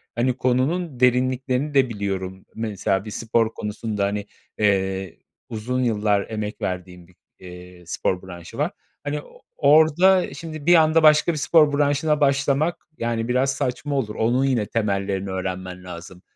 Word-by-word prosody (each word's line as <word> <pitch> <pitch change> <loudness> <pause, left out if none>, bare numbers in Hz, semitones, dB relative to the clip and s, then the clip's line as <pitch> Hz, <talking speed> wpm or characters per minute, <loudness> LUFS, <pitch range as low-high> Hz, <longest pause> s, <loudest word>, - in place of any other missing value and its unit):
hani, 120 +2 +1
konunun 130 +3 0
derinliklerini 130 +3 +1
de 135 -2 +3
biliyorum. 95 -3 -4
Mesela 100 -3 -1
bir 105 - -7
spor 115 0 0
konusunda, 105 -1 -3
hani, 100 0 -2 0.3
eee, 95 -3 0 0.3
uzun 125 +4 -2
yıllar 105 -3 +1
emek 105 -1 -5
verdiğim 90 -1 -5
bir, 90 - -24 0.2
eee, 90 0 -12
spor 90 +2 -2
branşı 90 -2 -10
var. - - 0 0.3
Hani, 145 0 -3
o - - -18 0.2
orada 160 +6 +4
şimdi 155 -3 -8
bir 175 +1 +6
anda 160 0 +4
başka 155 +2 +6
bir - - -4
spor 150 -1 +4
branşına 145 +1 +1
başlamak, 140 +4 +1
yani, 115 -1 -2
biraz 130 +2 +1
saçma 135 +2 -3
olur. 110 -6 -2
Onun 125 +4 +1
yine 125 -6 +1
temellerini 100 -3 -1
öğrenmen 95 -1 -5
lazım. 90 0 -10
115 Hz, 145 wpm, -23 LUFS, 95-140 Hz, 0.3 s, bir